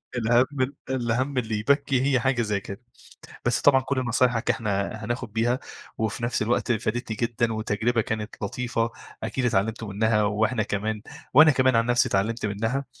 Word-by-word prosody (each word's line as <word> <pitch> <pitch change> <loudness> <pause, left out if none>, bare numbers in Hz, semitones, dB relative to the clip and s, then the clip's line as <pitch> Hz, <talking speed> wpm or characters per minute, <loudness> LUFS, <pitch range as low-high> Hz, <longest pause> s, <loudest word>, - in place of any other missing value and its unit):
الهَم 125 +3 +2 0.2
الهَم 130 +2 -1
اللي 110 -3 -1
يبكّي 135 +2 +2
هي 135 -2 +2
حاجة 130 -1 +1
زي 105 -3 0
كده. 100 +4 -9 0.6
بس - - +1
طبعًا 135 -2 +5
كل 135 0 -1
نصايحك 120 0 +1
إحنا 100 -4 0 0.2
هناخد 120 -2 -4
بيها 120 +3 +1 0.4
وفي 110 +2 -2
نفس 120 -1 -1
الوقت 120 +2 +1
فادتني 110 0 -2
جدًا 115 -1 0
وتجربة 110 +2 0
كانت 110 0 -4
لطيفة 115 +1 -1 0.3
أكيد 120 +3 -2
اتعلمتوا 110 +1 0
منها 105 0 +2
وإحنا 110 +3 +1
كمان 105 +1 -2 0.3
وأنا 155 +3 +8
كمان 130 -2 +3
عن 115 0 +3
نفْسي 120 +2 +2
اتعلّمت 110 +4 0
منها. 115 +7 -2
115 Hz, 155 wpm, -25 LUFS, 110-125 Hz, 0.6 s, وأنا